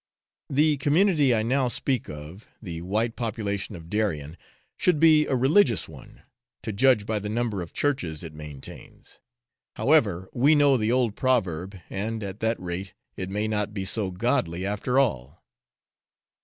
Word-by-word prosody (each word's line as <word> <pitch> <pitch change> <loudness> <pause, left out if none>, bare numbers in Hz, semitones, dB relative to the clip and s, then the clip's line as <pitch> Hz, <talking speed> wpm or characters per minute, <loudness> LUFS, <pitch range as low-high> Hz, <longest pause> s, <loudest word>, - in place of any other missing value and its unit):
The 150 +2 +3
community 150 0 +3
I 110 - +1
now 130 +3 +1
speak 125 0 -1
of, 75 +7 -10
the 85 -6 -7
white 110 +6 -1
population 105 -3 -3
of 80 -1 -11
Darien, 85 -7 -2 0.4
should 180 -5 +2
be 155 -1 +5
a 135 - +1
religious 130 - +3
one, - - -14 0.4
to 110 - -4
judge 120 -1 +3
by 110 -1 -1
the 105 +1 -5
number 110 -3 -1
of 85 - -7
Churches 90 - -2
it 80 -2 -8
maintains. 75 -3 -11 0.6
However, 105 - +2
we 140 +5 +4
know 145 -2 +5
the 110 -2 +1
old 120 -4 +1
proverb, 95 -7 0
and, 110 +3 -4
at 100 +1 -6
that 115 +1 0
rate, 90 +2 -6 0.2
it 95 - -5
may 105 +2 -1
not 105 -1 -2
be 95 -2 -3
so 100 +1 0
godly 95 -3 -1
after 105 +6 -1
all. 80 - 0
110 Hz, 155 wpm, -25 LUFS, 95-130 Hz, 0.6 s, be